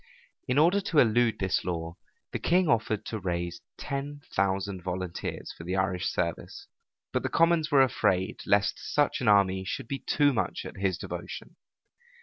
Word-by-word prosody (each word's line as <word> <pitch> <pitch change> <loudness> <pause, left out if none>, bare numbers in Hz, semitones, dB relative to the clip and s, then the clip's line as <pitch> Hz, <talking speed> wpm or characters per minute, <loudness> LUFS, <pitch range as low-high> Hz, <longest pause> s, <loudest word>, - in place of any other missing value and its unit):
In 125 - 0
order 175 +7 +4
to 180 -4 -2
elude 120 -2 +4
this 95 -1 0
law, 85 -2 -4 0.4
the - - -3
king 180 +1 +2
offered 110 -4 +1
to 110 - -4
raise 85 -2 -3 0.2
ten 145 +1 -5
thousand 95 0 0
volunteers 90 -1 -4
for - - -10
the 90 +2 -2
Irish 95 -1 0
service: 85 -2 -3 0.5
but - - +1
the - - -2
commons 165 -2 +3
were 140 -3 +6
afraid 95 -7 +1
lest 100 0 +2
such 145 -2 0
an 125 - -1
army 95 -2 +4
should 100 - -4
be 135 +1 -3
too 145 -2 +2
much 115 - -2
at - - -8
his 95 -3 0
devotion. - - -7
100 Hz, 165 wpm, -28 LUFS, 95-140 Hz, 0.5 s, were